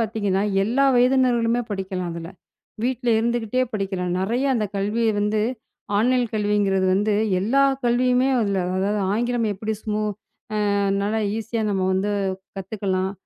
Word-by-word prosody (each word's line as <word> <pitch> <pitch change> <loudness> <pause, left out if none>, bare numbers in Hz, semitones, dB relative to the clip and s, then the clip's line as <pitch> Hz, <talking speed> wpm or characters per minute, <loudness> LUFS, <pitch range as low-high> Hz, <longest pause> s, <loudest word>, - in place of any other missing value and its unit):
பாத்தீங்கன்னா 205 -3 0 0.2
எல்லா 245 +7 +2
வயதினர்களுமே 245 -2 +3
படிக்கலாம் 190 -3 -3
அதுல. 165 0 -7 0.6
வீட்டுல 250 -1 -1
இருந்துகிட்டே 235 +1 0
படிக்கலாம். 190 -3 -2
நெறைய 235 +8 0
அந்தக் 210 -3 -2
கல்விய 210 +4 0
வந்து 210 +1 +1 0.6
ஆன்லைன் 245 +3 +2
கல்விங்குறது 205 -3 +1
வந்து 205 +2 +1 0.3
எல்லா 260 +8 +2 0.2
கல்வியுமே 250 +2 +3
அதுல 200 -3 0 0.2
அதாவது 200 +2 0
ஆங்கிலம் 240 +1 0
எப்படி 215 +3 -3
ஸ்மோ 215 0 -2 0.7
அ - - +1 0.3
நல்லா 210 +2 0 0.2
ஈசியா 225 0 -3
நம்ம 195 -2 0
வந்து 200 +2 0 0.4
கத்துக்கலாம். 190 -1 -2
215 Hz, 125 wpm, -23 LUFS, 195-240 Hz, 0.7 s, வயதினர்களுமே